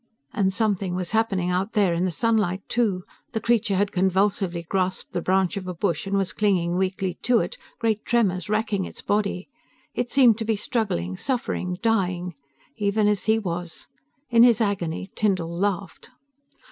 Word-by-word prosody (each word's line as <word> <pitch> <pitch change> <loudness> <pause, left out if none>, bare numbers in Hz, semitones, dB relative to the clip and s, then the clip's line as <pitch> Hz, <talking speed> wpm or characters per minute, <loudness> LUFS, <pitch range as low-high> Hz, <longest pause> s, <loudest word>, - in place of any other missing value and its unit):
And 195 -4 +1
something 195 -3 0
was 180 -1 -3
happening 195 -5 +1
out 190 +5 -1
there 200 -5 +3
in 170 +2 0
the - - +1
sunlight 200 -1 0
too. 210 -6 0 0.3
The 220 - 0
creature 225 -2 +1
had 200 +1 +1
convulsively 190 -1 +1
grasped 185 +2 -2
the 175 - -1
branch 190 +2 +1
of 185 -2 -5
a 180 - -4
bush 170 0 -1
and 200 0 0
was 195 -2 -1
clinging 180 -5 +1
weakly 190 0 -1
to 245 -1 +3
it, - - -1 0.2
great 220 -2 0
tremors 200 -6 +1
wracking 215 -3 0
its - - -10
body. 200 -3 -1 0.5
It 245 - -2
seemed 245 -5 +5
to 225 - -2
be 220 0 +1
struggling, 195 - -2
suffering, 185 -8 -2
dying... 180 -6 0 0.4
even 205 0 +1
as 210 -1 +1
he 220 0 +4
was. 175 -5 -5 0.4
In 230 -1 +6
his 240 -2 +6
agony, 195 -4 -2
Tyndall 185 -6 0
laughed. 195 +1 -2
195 Hz, 170 wpm, -24 LUFS, 180-220 Hz, 0.5 s, In